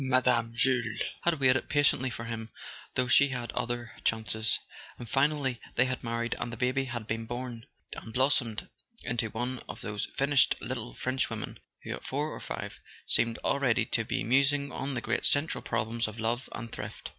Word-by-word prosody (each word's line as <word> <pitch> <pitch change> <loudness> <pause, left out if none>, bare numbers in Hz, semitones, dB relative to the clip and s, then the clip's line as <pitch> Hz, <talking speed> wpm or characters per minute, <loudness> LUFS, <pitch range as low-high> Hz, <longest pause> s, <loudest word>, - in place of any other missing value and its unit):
Mme. 125 -3 +3
Jules 120 -3 +4 0.3
had 170 -3 +3
waited 130 -2 +3
patiently 145 -3 +3
for 115 - -5
him, 115 -1 -5 0.5
though 125 0 +2
she 140 +3 +6
had 125 -3 -4
other 120 -1 -3
chances; 110 -1 +2 0.4
and 120 - -8
finally 135 -1 +1
they 130 - +4
had 130 -1 -3
married 115 0 -1
and 120 - -3
the 115 - -6
baby 130 +3 +1
had 120 -3 -5
been 115 +1 -3
born, 120 0 -5 0.3
and 110 - -8
blossomed 125 -3 +2 0.4
into 115 -2 -1
one 125 +3 -3
of - - -7
those 105 -1 -3
finished 140 -1 +4
little 120 -2 -5
Frenchwomen 130 +1 -2 0.2
who, - - -6
at - - -7
four 145 +3 -1
or - - -6
five, - - -6 0.3
seem 115 -1 +4
already 125 -4 +2
to 115 - 0
be - - -2
musing 140 +3 +3
on 135 0 -3
the 120 - -2
great 115 +1 -1
central 145 +3 +3
problems 115 0 -1
of 110 +1 -8
love 115 +3 -1
and 115 0 -6
thrift. - - -7
120 Hz, 180 wpm, -30 LUFS, 115-130 Hz, 0.5 s, she